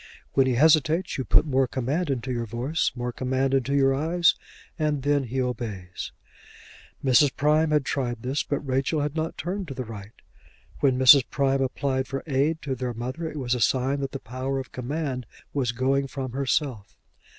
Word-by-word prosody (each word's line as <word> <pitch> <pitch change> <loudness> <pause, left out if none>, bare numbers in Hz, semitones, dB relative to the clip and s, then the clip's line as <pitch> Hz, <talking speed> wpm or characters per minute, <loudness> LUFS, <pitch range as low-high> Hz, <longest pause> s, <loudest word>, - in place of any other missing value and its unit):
When 135 -1 +4
he 125 - +1
hesitates 155 +4 +3
you - - 0
put - - +4
more 135 -3 +2
command 140 +8 -2
into 130 -1 -2
your 120 -2 -2
voice, 125 +9 -1
more 125 0 -3
command 130 +2 -1
into 135 +1 +1
your 135 -1 +4
eyes, 165 +5 +3 0.5
and 150 -3 0
then 145 -1 +2
he 130 +3 -3
obeys. 110 -8 -4 0.9
Mrs. 130 +2 +4
Prime 150 +2 +3
had 150 -2 +2
tried 120 -5 -2
this, 135 +4 0
but 145 - -2
Rachel 135 +2 0
had 145 +1 -2
not 160 0 -2
turned 190 +1 -3
to 135 - -7
the 130 0 -4
right. 105 -1 -9 0.7
When 130 -3 +3
Mrs. 130 0 +8
Prime 135 -1 +1
applied 130 0 -1
for 135 0 -4
aid 150 +2 0
to 135 - -2
their 125 -2 -4
mother, 130 +8 -4
it 155 - -8
was 125 -3 -1
a 125 - -1
sign 130 +4 +1
that 135 -1 -3
the - - -4
power 130 +2 -4
of 135 - -5
command 130 -2 -3 0.3
was 130 -4 0
going 135 +3 +1
from 135 -2 -5
herself. 130 -4 -2
135 Hz, 185 wpm, -25 LUFS, 125-145 Hz, 0.9 s, Mrs